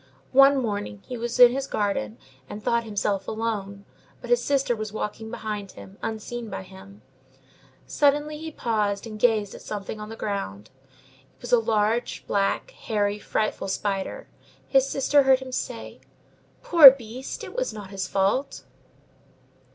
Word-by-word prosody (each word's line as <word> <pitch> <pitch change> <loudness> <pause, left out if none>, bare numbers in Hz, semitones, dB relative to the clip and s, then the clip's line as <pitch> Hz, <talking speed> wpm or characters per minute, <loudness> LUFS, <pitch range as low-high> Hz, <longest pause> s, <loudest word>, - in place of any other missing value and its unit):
One 275 +1 +6
morning 205 - -4
he 250 - -6
was 235 +1 -4
in 245 -1 +9
his 270 +2 -3
garden, 120 - -2 0.3
and 210 - -8
thought 235 0 +1
himself 200 -2 -2
alone, 205 -3 -4 0.3
but - - -8
his 485 - +3
sister 275 -4 +1
was 215 -1 -5
walking 220 +1 -5
behind 210 -4 -5
him, 195 +2 -13
unseen 225 +1 -5
by 95 - -6
him: 100 +2 -15 0.8
suddenly 295 +1 +1
he 320 0 -6
paused 210 -6 -1
and 215 -2 -8
gazed 215 -4 +2
at - - -10
something 210 +1 -6
on 210 0 -7
the 225 - -7
ground; 115 - -5 0.7
it - - -33
was 245 - -6
a 245 - +6
large, 225 +1 0
black, 200 - 0
hairy, 210 - -2
frightful 215 -1 -2
spider. 195 - -3 0.4
His 270 0 +3
sister 280 +1 +3
heard 265 -1 +5
him 260 0 -9
say:— - - -5 0.6
"Poor 325 -6 +11
beast! 255 0 -6
It - - -8
is - - -1
not 205 -2 -9
its 190 -1 -3
fault!" 200 +10 0
220 Hz, 155 wpm, -25 LUFS, 200-255 Hz, 0.8 s, Poor